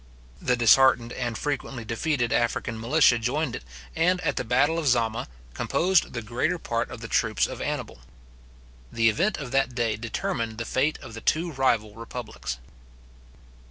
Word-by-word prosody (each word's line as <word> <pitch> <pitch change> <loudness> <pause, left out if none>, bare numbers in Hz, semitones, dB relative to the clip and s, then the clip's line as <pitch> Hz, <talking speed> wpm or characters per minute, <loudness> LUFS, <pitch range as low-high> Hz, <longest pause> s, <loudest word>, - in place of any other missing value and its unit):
The 125 - +2
disheartened 120 0 +5
and 120 -3 -3
frequently 135 -4 -3
defeated 120 +2 0
African 115 -1 0
militia 120 0 +4
joined 130 +4 -1
it, - - -12 0.3
and, 180 +3 +2
at - - 0
the - - -1
battle 135 +7 +2
of 155 - -2
Zama, 115 -2 +1 0.3
composed 185 0 +1
the 120 -2 -4
greater 120 +10 -1
part 115 -8 -2
of 120 - -9
the 115 - -6
troops 110 -2 +2
of - - -6
Annibal. - - -4 0.9
The 115 -1 +3
event 190 - +1
of 135 -4 -6
that 135 -2 +1
day 115 -3 0
determined 115 0 -3
the 115 - -4
fate 140 +7 +1
of 120 -3 -9
the 115 - -8
two 170 +2 +1
rival 120 -6 +1
republics. 115 - -6
120 Hz, 160 wpm, -26 LUFS, 115-140 Hz, 0.9 s, disheartened